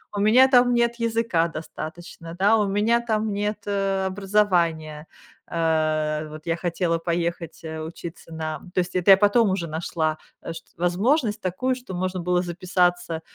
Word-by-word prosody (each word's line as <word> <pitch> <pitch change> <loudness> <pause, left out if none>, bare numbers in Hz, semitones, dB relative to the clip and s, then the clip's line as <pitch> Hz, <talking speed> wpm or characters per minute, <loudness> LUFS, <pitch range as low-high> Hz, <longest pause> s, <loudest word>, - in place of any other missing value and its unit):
У - - -1
меня 240 +6 +6
там 245 -1 +5
нет 235 0 +2
языка 230 -7 +1
достаточно, 165 +1 -8
да, 205 +3 +5
у 210 -2 +1
меня 215 +4 +2
там 220 -2 -1
нет, 210 +1 -2
э, 195 -1 0
образования. 175 -6 0 0.5
Э, 155 -2 0
вот, 155 +1 -10
я 165 - 0
хотела 170 -1 -1
поехать, 170 0 -3
э, 160 -1 -5
учиться 165 +1 -9
на 155 -1 -4
то - - +1
есть, 180 +1 -2
это 185 +2 +5
я 190 - +9
потом 205 +2 +4
уже 175 -3 -2
нашла, 155 0 -2 0.2
э, 165 - -6
шт - - -10
возможность 210 - +1
такую, 255 +8 -1
что 250 -7 -9
можно 185 0 -2
было 180 +1 +1
записаться 175 -1 0
180 Hz, 160 wpm, -24 LUFS, 165-210 Hz, 0.5 s, я